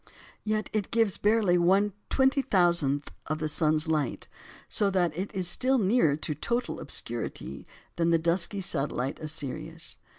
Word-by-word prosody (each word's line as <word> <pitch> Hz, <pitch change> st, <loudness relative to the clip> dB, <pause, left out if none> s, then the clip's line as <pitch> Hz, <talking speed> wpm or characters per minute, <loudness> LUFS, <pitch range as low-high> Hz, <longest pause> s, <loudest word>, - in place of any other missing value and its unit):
Yet 215 Hz, 0 st, -1 dB
it 215 Hz, -3 st, -1 dB
gives 225 Hz, -5 st, +1 dB
barely 205 Hz, -4 st, +3 dB
1/20000th 185 Hz, -, +2 dB, 0.2 s
of 155 Hz, -, -1 dB
the 155 Hz, 0 st, -2 dB
sun's 155 Hz, +1 st, +1 dB
light, 155 Hz, -5 st, -1 dB, 0.4 s
so 205 Hz, -, +2 dB
that 175 Hz, -5 st, +1 dB
it 190 Hz, +4 st, -3 dB
is 185 Hz, -2 st, -1 dB
still 260 Hz, +9 st, +2 dB
nearer 200 Hz, -, +3 dB
to 155 Hz, 0 st, -3 dB
total 235 Hz, +9 st, -2 dB
obscurity -, -, -5 dB, 0.3 s
than 170 Hz, 0 st, +2 dB
the 165 Hz, -, +4 dB
dusky 170 Hz, +4 st, -1 dB
satellite 135 Hz, -5 st, -2 dB
of 155 Hz, -, -6 dB
Sirius. 155 Hz, +3 st, -5 dB
175 Hz, 140 wpm, -28 LUFS, 155-210 Hz, 0.4 s, the